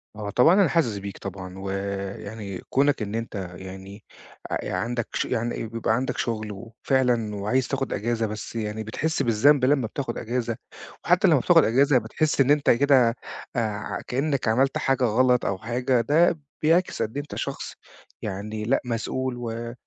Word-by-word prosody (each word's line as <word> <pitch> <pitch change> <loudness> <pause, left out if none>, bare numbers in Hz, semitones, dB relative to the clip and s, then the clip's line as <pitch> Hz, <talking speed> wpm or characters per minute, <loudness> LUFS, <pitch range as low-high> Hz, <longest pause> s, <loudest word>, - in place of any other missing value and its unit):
آه، 105 -1 -5
طبعًا، 125 - +5
أنا 195 -1 +5
حاسس 125 -12 +1
بيك 100 0 -7
طبعًا، 95 -1 -7
ويعني 100 +1 -5
كونك 140 -1 +2
إن 105 0 -3
أنت 100 -5 -4
يعني 95 +2 -10 0.5
أ - - -2
ي - - -3
عندك 115 +5 -2
ش - - 0
يعني 115 0 -2
بيبقى 115 0 0
عندك 130 +2 -2
شُغل، 110 -2 -2
وفعلًا 115 +1 -1
وعايز 110 +6 0
تاخد 135 -1 -2
أجازة، 115 +2 -1
بس 105 +1 -6
يعني 110 -1 -3
بتحس 150 +9 -1
بالذنب 130 +4 +4
لمّا 135 -3 +2
بتاخد 120 0 -4
أجازة، 120 -1 -2 0.5
وحتى - - +4
لمّا - - +5
بتاخد - - +5
أجازة، 135 +4 +4
بتحس 150 +3 0
إن 135 +1 +4
أنت 145 -1 +3
كده 125 -2 +4 0.4
آآ، 110 -3 -2
كأنك 140 0 -1
عملت 130 +5 +2
حاجة 135 -1 +1
غلط 125 +2 +3
أو 100 - 0
حاجة، 120 +3 0
ده 160 +6 +3 0.2
بيعكس 165 +4 +2
قد 110 - -2
إيه - - 0
أنت 145 - -9
شخص - - -4 0.5
يعني 105 +2 -4
لأ، 120 +5 +1
مسؤول، 125 +2 -2
و 115 0 -5
115 Hz, 165 wpm, -25 LUFS, 105-130 Hz, 0.5 s, طبعًا